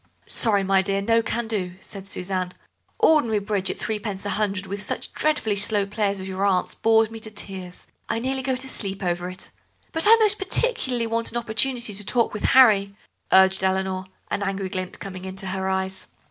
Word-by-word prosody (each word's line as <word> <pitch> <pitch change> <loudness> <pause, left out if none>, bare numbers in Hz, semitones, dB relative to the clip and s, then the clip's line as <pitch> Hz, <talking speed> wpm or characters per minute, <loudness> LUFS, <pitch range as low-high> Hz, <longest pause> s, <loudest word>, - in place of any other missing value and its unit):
"Sorry, 205 -4 +2
my 195 0 +3
dear, 195 +1 -1
no 230 +3 +2
can 230 +1 -2
do," 185 -5 -2
said 195 0 -8
Suzanne; 185 -1 -3 0.4
"ordinary 245 -9 +4
bridge 200 -2 0
at - - -3
three 220 -1 -2
pence 200 -2 -5
a 205 - -1
hundred, 200 -1 -1
with 200 +2 -5
such - - -4
dreadfully 295 -9 0
slow 205 0 +2
players 200 -1 -1
as 190 - -6
your 190 +1 -3
aunts, 190 -2 +1
bores 225 0 +3
me 225 - -7
to 220 - -7
tears. 190 -4 -7 0.2
I - - 0
nearly 265 +3 -1
go 260 0 -1
to 260 +1 -5
sleep 195 -6 -2
over 175 0 -1
it." 185 - -11 0.4
"But 325 +4 +2
I 450 - +10
most 425 -1 +3
particularly 380 - 0
want 230 0 -1
an 240 - -2
opportunity 235 0 -1
to 205 +1 0
talk 235 +3 +1
with 210 - -3
Harry," 200 -6 +6 0.4
urged 190 0 +6
Eleanor, 190 0 0 0.3
an - - -1
angry 195 -1 -2
glint 185 -1 -4
coming 185 -2 -8
into 190 0 -6
her 190 0 -2
eyes. 190 0 -2
200 Hz, 200 wpm, -24 LUFS, 190-230 Hz, 0.4 s, I